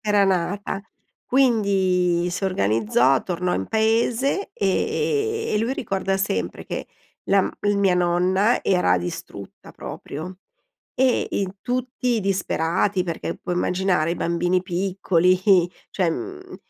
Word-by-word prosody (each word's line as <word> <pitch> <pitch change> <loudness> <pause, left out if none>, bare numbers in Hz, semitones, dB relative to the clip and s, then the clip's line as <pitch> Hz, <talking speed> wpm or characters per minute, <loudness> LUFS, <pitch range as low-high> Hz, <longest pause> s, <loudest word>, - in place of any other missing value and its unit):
Era 205 -2 +3
nata. 195 +2 -1 0.4
Quindi 190 -8 +2
si 195 - -3
organizzò, 120 - +2
tornò 180 0 -1
in 95 - -2
paese 235 - +1
e 435 - 0
e - - +2
lui 230 +4 0
ricorda 195 -6 -1
sempre 195 +2 -2
che - - -5 0.4
la 195 0 +4
m - - -2 0.3
mia 195 -2 +3
nonna 180 +5 +2
era 135 - +2
distrutta 90 0 -8
proprio. 180 +6 -8 0.6
E 260 -1 +2
i 195 - 0
tutti 245 -1 -1
disperati, 185 0 0
perché 170 -3 -4
puoi 180 - -4
immaginare 180 -3 +1
i - - -2
bambini 175 +2 0
piccoli, 185 -1 +1 0.5
cioè, 180 -4 +1
mhmm, 375 - -6
190 Hz, 120 wpm, -23 LUFS, 175-220 Hz, 0.6 s, la